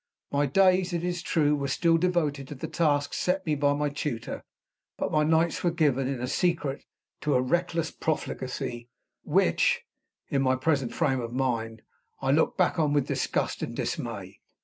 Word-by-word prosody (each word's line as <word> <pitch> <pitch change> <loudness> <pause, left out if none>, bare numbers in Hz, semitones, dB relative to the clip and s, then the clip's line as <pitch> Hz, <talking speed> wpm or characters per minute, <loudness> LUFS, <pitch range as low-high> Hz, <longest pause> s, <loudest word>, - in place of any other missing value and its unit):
My 145 0 +2
days, 185 +3 +3
it 170 -1 -1
is 175 -1 -2
true, 150 -3 +2
were 140 -1 -2
still 165 +4 +2
devoted 155 -6 0
to 145 - -7
the 130 - -5
tasks 145 -4 +1
set 185 +1 0
me 155 - +1
by 145 0 +2
my 145 0 0
tutor; 140 -5 -4 0.5
but - - -2
my 155 0 +3
nights 160 +2 +2
were 175 - +3
given, 145 -6 +1
in 130 -2 -2
secret, 150 -1 -1 0.3
to 150 - 0
a - - +4
reckless 170 +3 0
profligacy, 125 -5 -3 0.3
which 475 - +2 0.4
(in 140 -4 0
my 130 -1 +3
present 135 -2 0
frame 135 -6 +1
of 115 0 -5
mind) 115 -4 -2 0.4
I 135 - +1
look 155 +3 +2
back 180 -2 +2
on 150 -2 +2
with 145 -3 +2
disgust - - -1
and - - -4
dismay. - - -4
150 Hz, 170 wpm, -27 LUFS, 135-170 Hz, 0.5 s, a